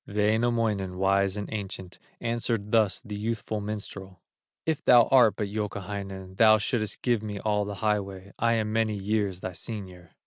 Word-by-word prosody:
Wainamoinen, 105 -2 +1
wise 100 +1 +2
and 105 - -4
ancient, 95 -3 -6 0.2
Answered 115 -3 -2
thus 110 -5 +3
the 105 - -5
youthful 110 0 -3
minstrel: 100 -3 -6 0.5
"If 160 -2 -1
thou 120 -1 +7
art 125 -5 +6
but 105 - -2
Youkahainen, 100 -2 -5
Thou 110 0 +7
shouldst 110 0 -2
give 120 -4 +2
me 105 -2 -5
all 105 -1 0
the 100 0 -5
highway; 100 -2 -1
I 115 0 +3
am 110 -1 0
many 110 -1 +1
years 100 -2 -1
thy 95 - -4
senior." 90 -4 -8
105 Hz, 160 wpm, -27 LUFS, 100-110 Hz, 0.5 s, thou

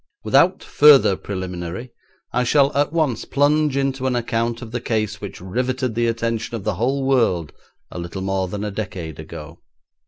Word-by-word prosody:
Without - - +3
further 145 -9 +6
preliminary 95 +4 -6 0.4
I 125 +1 +2
shall 140 +3 +3
at 145 +1 +2
once 155 -7 0
plunge 145 0 +2
into 135 -1 0
an 130 - 0
account 115 0 -1
of 110 - -9
the 120 0 -3
case 110 -3 -2
which 100 - -7
riveted 125 +6 -2
the 120 +1 +1
attention 115 0 -2
of 110 - -5
the 105 - 0
whole 130 +8 0
world 115 - +1 0.4
a - - -6
little 85 +2 -5
more 95 -1 -1
than 100 +3 -5
a 105 - -3
decade 90 -7 -6
ago. - - -9
115 Hz, 175 wpm, -21 LUFS, 95-130 Hz, 0.4 s, further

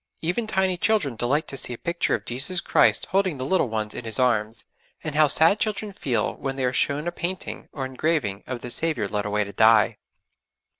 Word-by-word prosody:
Even 180 +8 -1
tiny 190 -3 +1
children 185 - +1
delight 140 +7 0
to 135 - -6
see 125 - -3
a - - -7
picture 170 +5 0
of - - -7
Jesus 135 +9 +1
Christ - - +3
holding 190 -5 +1
the 130 - -4
little 145 -4 +1
ones 110 -1 -3
in - - -6
His 110 -1 -4
arms; 115 -3 0 0.4
and 155 - -4
how 155 +1 +5
sad 160 +8 +4
children 215 -1 -2
feel 120 - -1
when 135 -1 -4
they 135 -1 -1
are 125 - 0
shown 145 +5 0
a - - 0
painting 175 +2 -4
or 135 -3 -4
engraving 130 -7 -1
of 125 -2 -5
the 120 - -5
Saviour 155 -10 0
led 105 0 -2
away 105 0 +1
to 100 0 -9
die! 110 0 +4
135 Hz, 210 wpm, -24 LUFS, 115-175 Hz, 0.4 s, how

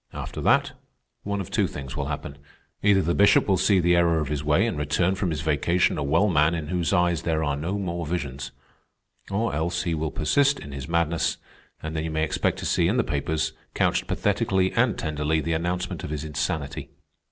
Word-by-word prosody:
After - - -6
that, - - +3 0.5
one 100 0 -3
of 90 - -8
two - - +2
things 70 -2 -7
will - - -2
happen: 70 0 -5 0.4
either 100 -2 +4
the 85 +2 +1
Bishop 100 +2 +5
will 95 - +4
see 95 +1 +3
the 90 0 +3
error 85 -1 +3
of 75 -3 -2
his 75 -1 -2
way 75 +7 +3
and 115 - -1
return 75 +5 +1
from 95 -1 -1
his 75 -3 -2
vacation 80 +4 +1
a - - -1
well 80 +9 +2
man 80 -3 +3
in 80 -3 -5
whose 90 -2 0
eyes 90 -3 +2
there 80 -2 0
are 70 -2 0
no 85 +8 -3
more 85 -3 -3
visions, 70 -6 -4 0.8
or 105 +2 -1
else 85 +3 -1
he 85 - -1
will 80 0 -1
persist 140 - +2
in 70 - -9
his 70 +1 -6
madness, 85 0 0 0.5
and 80 0 -4
then 80 - -1
you 80 - -3
may 80 0 -1
expect 80 - 0
to - - -6
see - - +2
in - - +1
the - - +3
papers, 80 -1 -1 0.2
couched - - +1
pathetically 95 -1 +1
and 120 -1 +2
tenderly, 75 0 -1
the 80 +1 -1
announcement 90 +2 -2
of - - -5
his 75 0 -4
insanity. 75 -1 -3
80 Hz, 210 wpm, -25 LUFS, 75-90 Hz, 0.8 s, Bishop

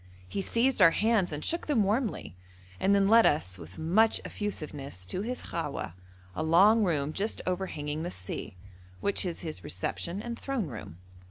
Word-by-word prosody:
He 195 - -3
seized 235 +3 +2
our 175 - +10
hands 210 0 +2
and 150 0 -4
shook 335 - 0
them 265 -8 +3
warmly, 210 - -1 0.4
and 200 +1 +4
then 195 -1 +4
led 225 +2 +7
us 95 -11 0
with 85 +2 -11
much 205 +8 +3
effusiveness 145 - -5
to 180 - -3
his 245 +4 -4
khawah, 150 - -4 0.4
a - - -2
long 195 +8 +5
room 155 -5 0
just 210 +6 -1
overhanging 155 -5 -2
the 170 - -3
sea, 95 - -6 0.4
which 200 -1 0
is 170 - -5
his 155 - -6
reception 170 - -3
and 235 +2 -5
throne 270 -7 -2
room. 110 - -8
180 Hz, 170 wpm, -29 LUFS, 150-215 Hz, 0.4 s, our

